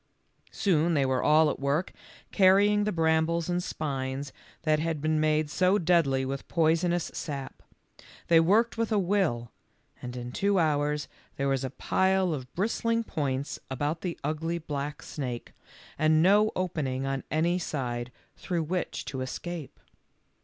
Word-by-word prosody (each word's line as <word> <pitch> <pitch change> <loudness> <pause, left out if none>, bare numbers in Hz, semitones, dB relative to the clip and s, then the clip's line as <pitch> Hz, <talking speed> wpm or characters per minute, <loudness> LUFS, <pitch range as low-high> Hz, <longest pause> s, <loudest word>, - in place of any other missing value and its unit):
Soon 170 -3 +1
they 140 -2 +3
were 130 -1 +1
all 155 +1 +5
at - - -6
work 140 +6 0 0.4
carrying 205 +2 +4
the 210 - 0
brambles 160 0 +1
and 175 0 0
spines 135 -4 -4 0.3
that 155 -1 +2
had 160 -1 -1
been 155 +1 +1
made 155 0 +2
so 185 +6 +2
deadly 160 -7 +2
with 135 +1 -5
poisonous 170 +1 +1
sap. 140 -4 -6 0.6
They 165 -1 +5
worked 215 +8 +3
with 230 0 0
a 215 - +3
will, 175 - 0 0.5
and 125 0 -6
in 125 0 -6
two 200 +8 +1
hours 150 -2 +1 0.3
there 140 - -1
was 135 -1 0
a 130 - -2
pile 190 +4 +1
of 130 -3 -6
bristling 230 +4 0
points 140 -7 -3
about 145 +5 -2
the 180 -3 -3
ugly 160 +3 -2
black 145 -2 -5
snake, 125 -5 -5 0.5
and 155 +1 +4
no 210 +4 +5
opening 145 -8 -2
on 135 0 -2
any 170 +3 +1
side 125 -7 -3 0.2
through 175 -3 -2
which 180 +3 -3
to 130 -2 -4
escape. 160 +3 -6
155 Hz, 150 wpm, -28 LUFS, 140-180 Hz, 0.6 s, all